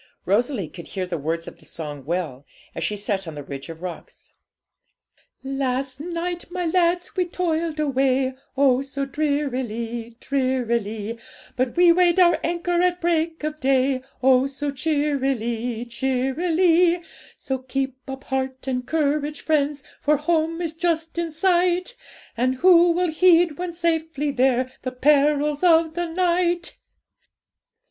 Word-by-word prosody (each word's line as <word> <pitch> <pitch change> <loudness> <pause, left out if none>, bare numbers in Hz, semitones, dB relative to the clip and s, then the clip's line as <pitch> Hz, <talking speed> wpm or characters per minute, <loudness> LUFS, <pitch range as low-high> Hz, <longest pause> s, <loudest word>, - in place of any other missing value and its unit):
Rosalie 215 - +1
could 170 +2 -11
hear 190 -2 -3
the 175 -3 -4
words 165 +3 -3
of - - -10
the - - -18
song 145 -4 -7
well, 155 -5 -3 0.3
as - - -4
she 210 - -1
sat 200 -2 -2
on 160 - -6
the 145 - -6
ridge 135 +2 -8
of 165 +1 -9
rocks 180 -2 -9 1.1
'Last 265 -1 -2
night, 345 +2 -4
my 355 0 -3
lads, 350 +1 +1
we 365 - +1
toiled 335 -3 -2
away, 265 -2 +1 0.2
Oh! 265 -2 +4
so 275 0 -4
drearily, 250 -6 -2
drearily; 235 -5 -1 0.4
But 255 +2 -1
we 350 -1 +7
weighed 350 +1 +4
our 350 -1 +5
anchor 345 +1 0
at 360 0 +1
break 330 -2 0
of 305 0 -3
day, 265 -1 +2 0.2
Oh! 260 0 +5
so 280 +1 -4
cheerily, 265 -5 -1
cheerily; 330 +8 +2 0.3
So 265 -1 -3
keep 265 +1 -2 0.2
up 265 0 -6
heart 265 -1 -3
and 250 -1 -1
courage, 300 -1 0
friends! 295 -2 0 0.2
For 300 0 +3
home 330 +2 0
is 325 -2 -3
just 330 0 -1
in 335 -1 -2
sight; 360 +5 +1 0.4
And 255 +2 +1
who 345 +3 +6
will 350 0 +1
heed, 340 -2 +4
when 360 -1 -3
safely 325 -3 -1
there, 255 -1 +2
The 255 - -4
perils 290 +2 +3
of 330 -2 +4
the 345 +1 -2
night? 350 0 0
285 Hz, 140 wpm, -23 LUFS, 255-335 Hz, 1.1 s, we